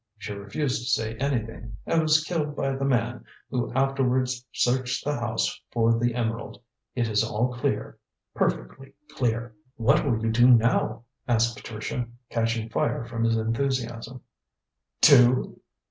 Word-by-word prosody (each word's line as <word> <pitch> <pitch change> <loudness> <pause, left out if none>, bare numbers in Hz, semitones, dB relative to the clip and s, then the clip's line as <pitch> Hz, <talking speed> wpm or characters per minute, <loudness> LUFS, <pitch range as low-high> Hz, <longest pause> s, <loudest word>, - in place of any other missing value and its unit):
She 105 0 -6
refused 115 +6 -2
to 125 - -4
say 110 -3 0
anything 115 -5 -3
and 165 - +2
was 155 0 +3
killed 155 -3 -2
by 135 -2 -1
the 135 - -3
man, 120 -2 0 0.3
who 120 -3 -1
afterwards 130 -1 +1
searched 125 +1 0
the 145 - 0
house 120 -3 -2
for 115 0 +2
the 120 0 0
emerald. 115 -1 -3 0.4
It 120 -2 0
is 105 -2 +2
all 120 +4 -1
clear, 125 - -2 0.3
perfectly 135 - -2 0.2
clear." 115 -4 -1 0.2
"What 135 +6 +3
will 120 -7 +1
you 115 - +1
do 120 +2 +5
now?" 115 -1 +3 0.2
asked 120 -1 +2
Patricia, 110 +3 -5 0.2
catching 115 -1 0
fire 115 +1 -1
from 115 -1 -2
his 115 0 +2
enthusiasm. 120 +1 -2 0.8
"Do?" 130 -3 +5
120 Hz, 145 wpm, -26 LUFS, 115-130 Hz, 0.8 s, do